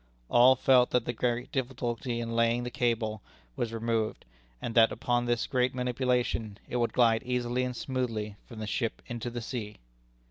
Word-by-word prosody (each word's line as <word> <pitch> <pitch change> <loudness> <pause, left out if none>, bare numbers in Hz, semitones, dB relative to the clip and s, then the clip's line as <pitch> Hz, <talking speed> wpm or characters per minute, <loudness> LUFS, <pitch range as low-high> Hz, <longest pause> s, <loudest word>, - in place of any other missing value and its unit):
All 125 +2 +7
felt 125 -1 +4
that 125 -2 +1
the 120 - -2
great 125 +1 -1
difficulty 125 -2 -2
in 115 0 -3
laying 115 +1 +2
the 125 - -4
cable 115 -4 0 0.3
was 115 - -2
removed, 115 -1 -1 0.3
and 115 - -4
that 115 -1 +6 0.2
under 120 0 +2
this 120 -1 +1
gentle 125 0 +1
manipulation 125 -4 0
it 125 - -2
would 120 -1 +1
glide 115 -2 +4
easily 125 0 -1
and 125 -1 -3
smoothly 115 -6 -3
from 115 - -11
the 110 - -4
ship 115 +2 -2
into 120 0 -4
the 120 0 -5
sea. 115 -3 -5
120 Hz, 175 wpm, -29 LUFS, 115-125 Hz, 0.3 s, All